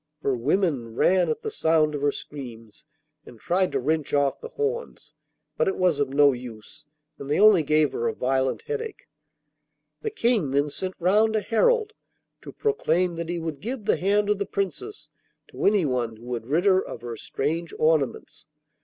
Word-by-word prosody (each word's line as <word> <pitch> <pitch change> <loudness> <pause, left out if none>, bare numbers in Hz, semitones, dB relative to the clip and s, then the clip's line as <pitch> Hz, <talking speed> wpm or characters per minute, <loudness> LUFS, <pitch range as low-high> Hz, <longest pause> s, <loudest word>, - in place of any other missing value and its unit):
Her 135 - +1
women 130 - 0
ran 185 +7 +3
at 460 -1 -2
the 440 -1 -4
sound 160 - +2
of 145 - -4
her 145 0 +2
screams, 120 -5 -10 0.4
and 115 - -14
tried 185 - 0
to - - +1
wrench 150 +2 -1
off 140 -1 +1
the 470 - -7
horns, 475 0 -4 0.4
but 485 -1 +2
it 390 - +1
was 180 -5 +2
of 140 -2 +1
no 140 +1 +5
use, 120 -3 -10 0.3
and 140 - -7
they 150 - +1
only 210 -4 +7
gave 155 -1 +2
her 115 - -2
a - - -2
violent 130 0 0
headache. 450 -1 -5 0.9
The 440 - -2
King 235 - +1
then 140 +2 +1
sent 185 +5 -5
round 210 +5 +3
a - - +3
herald 435 - +2 0.5
to - - -9
proclaim 185 - 0
that 170 0 -4
he 175 - -2
would 160 -3 -4
give 235 0 -5
the 215 - +2
hand 205 +3 +1
of 205 - 0
the 200 - -2
Princess 200 - -4 0.4
to - - -5
anyone 130 - +1
who 115 +2 -15
would 120 -2 -5
rid 160 +7 +1
her 190 -1 +4
of - - -8
her 120 -1 -6
strange 160 +8 -3
ornaments. 150 -1 0
165 Hz, 185 wpm, -25 LUFS, 140-210 Hz, 0.9 s, only